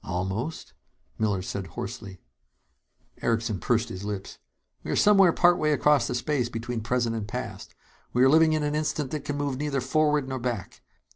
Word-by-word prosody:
"Almost?" 95 Hz, -, -4 dB, 0.5 s
Miller 100 Hz, -4 st, 0 dB
said 95 Hz, 0 st, -4 dB
hoarsely. 95 Hz, +1 st, -7 dB, 1.0 s
Erickson 115 Hz, -3 st, 0 dB
pursed 120 Hz, +2 st, +1 dB
his 95 Hz, +1 st, -7 dB
lips. 100 Hz, -2 st, -5 dB, 0.4 s
"We -, -, -7 dB
are -, -, 0 dB
somewhere 195 Hz, -4 st, +6 dB
partway 170 Hz, -3 st, +3 dB
across 145 Hz, -4 st, +3 dB
the 125 Hz, -, -2 dB
space 125 Hz, -1 st, 0 dB
between 115 Hz, 0 st, -4 dB
present 120 Hz, 0 st, 0 dB
and 110 Hz, -2 st, -4 dB
past. -, -, -6 dB, 0.4 s
We 125 Hz, -, +3 dB
are 130 Hz, -, +6 dB
living 160 Hz, +2 st, +5 dB
in 155 Hz, -1 st, 0 dB
an 145 Hz, 0 st, -1 dB
instant 150 Hz, -2 st, -1 dB
that 155 Hz, -, -4 dB
can 145 Hz, -, -3 dB
move 140 Hz, -2 st, -2 dB
neither 145 Hz, -1 st, -1 dB
forward 150 Hz, +2 st, +1 dB
nor 130 Hz, -1 st, -3 dB
back. 120 Hz, -6 st, -4 dB
125 Hz, 170 wpm, -26 LUFS, 110-150 Hz, 1.0 s, somewhere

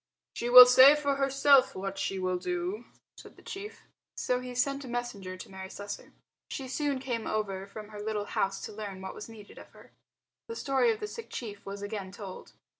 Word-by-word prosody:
"She 240 Hz, -, -3 dB
will 250 Hz, 0 st, +13 dB
say 260 Hz, +3 st, +8 dB
for 285 Hz, -2 st, -1 dB
herself 275 Hz, -1 st, +4 dB
what 195 Hz, +1 st, -5 dB
she 195 Hz, -, -2 dB
will 185 Hz, -1 st, -1 dB
do," 360 Hz, -, -3 dB, 0.3 s
said -, -, -14 dB
the -, -, -19 dB
chief. 400 Hz, +2 st, -8 dB, 0.3 s
So 250 Hz, 0 st, 0 dB
he 250 Hz, 0 st, -7 dB
sent 275 Hz, +3 st, 0 dB
a -, -, -9 dB
messenger 220 Hz, -7 st, -5 dB
to -, -, -9 dB
Mary 190 Hz, 0 st, -9 dB
Slessor. 205 Hz, +1 st, -8 dB, 0.4 s
She 270 Hz, -, -5 dB
soon 285 Hz, +1 st, -1 dB
came 245 Hz, -4 st, -4 dB
over 195 Hz, -3 st, -2 dB
from 210 Hz, +1 st, -10 dB
her 210 Hz, -1 st, -8 dB
little 210 Hz, -1 st, -2 dB
house 195 Hz, -1 st, -1 dB
to -, -, -7 dB
learn 205 Hz, -3 st, -7 dB
what 190 Hz, -, -6 dB
was 215 Hz, -, -9 dB
needed 215 Hz, -2 st, -13 dB
of -, -, -13 dB
her. -, -, -17 dB, 0.6 s
The 460 Hz, -, -6 dB
story 275 Hz, -, +2 dB
of 440 Hz, -, -4 dB
the 425 Hz, -, -3 dB
sick 460 Hz, +2 st, -9 dB
chief 205 Hz, -4 st, -7 dB
was 200 Hz, +1 st, -6 dB
again 205 Hz, -2 st, -5 dB
told. 195 Hz, -2 st, -10 dB
230 Hz, 205 wpm, -29 LUFS, 200-275 Hz, 0.6 s, will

